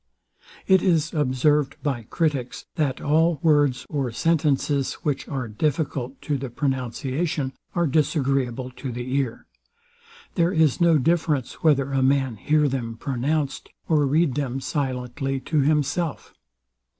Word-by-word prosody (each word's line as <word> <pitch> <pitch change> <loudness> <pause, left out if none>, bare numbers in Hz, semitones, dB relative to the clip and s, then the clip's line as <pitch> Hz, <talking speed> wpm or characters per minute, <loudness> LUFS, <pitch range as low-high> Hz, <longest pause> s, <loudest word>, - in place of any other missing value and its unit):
It 190 -1 +5
is 165 -4 +1
observed 145 0 +2
by 125 -7 -2
critics, 145 -7 -1
that 145 -6 -1
all 160 +2 +2
words 145 -5 +3
or 140 -5 -2
sentences, 145 -1 +1
which 145 -3 -1
are 130 -4 -3
difficult 135 +2 -2
to 145 -2 -1
the 135 -1 -5
pronunciation, 135 +3 -2 0.2
are 170 -1 +2
disagreeable 135 -4 0
to 135 - -5
the 125 +2 -4
ear. 135 -5 -2 0.9
There 170 -1 +2
is 160 -4 +2
no 170 -2 +5
difference, 150 -2 0
whether 140 -5 +3
a 135 -1 +1
man 130 -3 +2
hear 150 +6 +2
them 120 -4 -3
pronounced, 140 +3 -2 0.2
or 150 -3 +3
read 155 0 +2
them 135 -2 -2
silently 135 -1 -2
to 155 +3 0
himself. 150 +2 0
140 Hz, 130 wpm, -24 LUFS, 130-155 Hz, 0.9 s, It